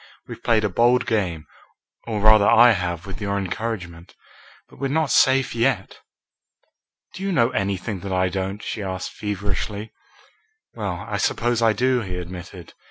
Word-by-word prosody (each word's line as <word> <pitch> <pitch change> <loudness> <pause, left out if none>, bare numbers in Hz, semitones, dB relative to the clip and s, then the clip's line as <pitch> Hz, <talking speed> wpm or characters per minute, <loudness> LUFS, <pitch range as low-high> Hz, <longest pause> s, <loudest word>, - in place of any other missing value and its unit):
We've - - -9
played 115 -2 +2
a 105 - +1
bold 120 +5 +3
game, 90 -8 -1 0.6
or 110 -3 -2
rather 110 -1 +6
I 120 +2 +7
have 90 -4 -2
with 95 +1 -8
your 100 0 -1
encouragement, 95 -3 -5 0.5
but - - -18
we're 135 - -1
not 150 -1 0
safe 130 0 +4
yet." 115 -4 0 1.1
"Do - - -9
you 195 0 -1
know 120 -9 +3
anything 100 0 -2
that 100 +1 -6
I 95 0 +2
don't?" 95 +2 -4
she 110 - -4
asked 95 -1 -4
feverishly. 105 +1 -4 0.8
"Well, - - -4
I - - -2
suppose 120 0 0
I 115 -1 +4
do," 125 +1 +1
he 95 -4 -5
admitted. 90 0 -9
105 Hz, 160 wpm, -23 LUFS, 95-115 Hz, 1.1 s, I